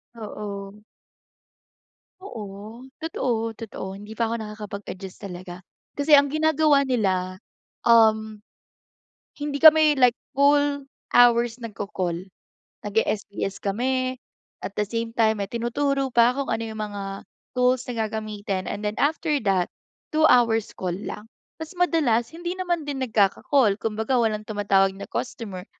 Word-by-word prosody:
Oo. 205 -2 -7 1.4
Oo, 215 - -9 0.2
totoo-totoo 225 -9 -3
hindi 210 +2 -11
pa 225 +1 -1
ako 230 - -2
nakakapag 210 -1 -7
adjust 190 +1 -10
talaga. 180 -1 -8 0.3
Kasi 290 +1 +5
ang 285 - +1
ginagawa 310 -1 +3
nila, 190 -7 0 0.5
um, 220 -2 +4 1.0
hindi 290 -1 -2
kami 310 -1 +8
like 250 -2 +4 0.2
full 285 0 +3 0.3
hours 240 -1 +5
nagko-call. 190 -4 -4 0.6
Nag-e-SBS 200 -2 -2
kami, 255 +5 -1 0.5
at 190 - -4
the 210 - 0
same 230 +1 -3
time 220 -3 +2
may 195 - -8
tinuturo 270 +4 0
pa 235 +1 +6
kung 275 +1 -3
ano 225 0 -1
yung 220 -1 -6
mga, 200 -2 -5 0.3
tools 250 0 +3
na 225 -2 -1
gagamitin 210 -3 -4
and 210 +1 -5
then 210 - 0
after 300 +1 +1
that, 190 -4 +2 0.5
2 310 - +2
hours 230 -3 +4
call 180 -2 -2
lang. 210 +2 -7 0.3
Tas 320 +2 -8
madalas, 310 -10 +2
hindi 345 +2 -5
naman 350 -4 -2
din 280 -2 -4
nagkaka-call, 220 0 +2
kumbaga 220 +3 -2
walang 215 -1 -1
tumatawag 200 -2 +2
na 195 - -9
customer, 205 -7 -5
225 Hz, 130 wpm, -24 LUFS, 205-265 Hz, 1.4 s, kami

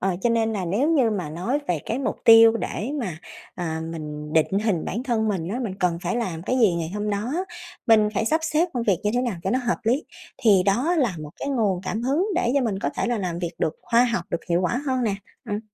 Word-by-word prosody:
ờ, 190 -2 0
cho 240 - +3
nên 225 -1 +1
là 195 -4 -2
nếu 230 - +1
như 265 -8 +3
mà 185 -8 -3
nói 185 - -1
về 175 - +1
cái 230 - -1
mục 275 - -2
tiêu 225 0 +8
để 230 +2 -3
mà, 185 -9 -4 0.4
à, 160 -3 -3
mình 150 -1 -6
định 165 +4 +2
hình 190 -7 +1
bản 225 +6 -3
thân 230 -4 0
mình 180 -5 -2
á, 220 +6 -2
mình 220 -7 -3
cần 175 -2 +1
phải 235 - -1
làm 180 -9 -3
cái 255 +8 0
gì 215 -8 +4
ngày 165 -1 -3
hôm 210 0 -2
đó, 210 +6 -2 0.5
mình 220 -3 +5
phải 220 - +1
sắp 315 +8 +2
xếp 325 +3 +1
công 245 - 0
việc 200 -5 +2
như 210 - +1
thế 245 - +2
nào 235 -7 -2
cho 190 - 0
nó 255 - +2
hợp 240 -2 -1
lý, 250 +7 +1 0.3
thì 210 -7 +5
đó 255 - +2
là 245 -10 +1
một 150 -1 -7
cái - - -3
nguồn 215 -9 +1
cảm 215 +4 -3
hứng 285 +10 +1
để 245 -9 +1
cho 280 - +4
mình 220 -6 -1
có 140 - -1
thể - - 0
là 240 -1 0
làm 180 -4 -3
việc 175 -1 -3
được 160 - 0
khoa 235 +1 +4
học 235 -8 -1
được 170 - -3
hiệu 175 +1 +2
quả 210 +8 0
hơn 260 -2 0
nè. 215 -4 +1 0.3
Ừm. 210 -2 -3
215 Hz, 265 wpm, -24 LUFS, 180-245 Hz, 0.5 s, tiêu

